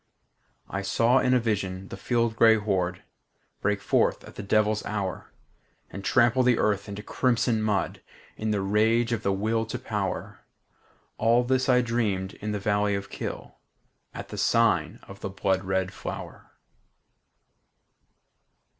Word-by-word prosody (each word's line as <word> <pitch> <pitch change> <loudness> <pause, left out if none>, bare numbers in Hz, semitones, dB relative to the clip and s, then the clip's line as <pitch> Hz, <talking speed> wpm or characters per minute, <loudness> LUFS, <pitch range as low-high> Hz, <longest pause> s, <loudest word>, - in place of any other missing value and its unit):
I 95 - -3
saw 115 +6 +3
in 125 0 +3
a - - +4
vision 95 -4 -2
the - - -6
field 115 -2 0
gray 115 -1 +6
horde 95 -4 -1 0.6
Break 100 0 0
forth - - +1
at - - -12
the - - -7
devil's 105 +1 +1
hour, 100 -5 -4 0.6
And 100 - -7
trample 120 +5 +3
the 125 -2 +3
earth 100 -1 0
into 100 +1 -6
crimson 120 -2 +1
mud 105 -2 -1 0.3
In 110 - -3
the 105 -2 0
rage 110 +4 +2
of 115 - -2
the 100 - 0
Will 110 +3 0
to 120 - -4
Power, 105 -6 -4 0.8
All 115 +2 +4
this 130 +1 +1
I 125 -1 +5
dreamed 110 -6 -1
in 105 +1 -3
the 105 - -1
valley 105 0 +1
of 100 - -6
Kyll, - - -6 0.5
At - - -8
the - - -6
sign - - +2
of 100 0 -12
the - - -4
blood 95 0 0
red 95 0 -1
flower. - - -8
105 Hz, 150 wpm, -26 LUFS, 100-115 Hz, 0.8 s, gray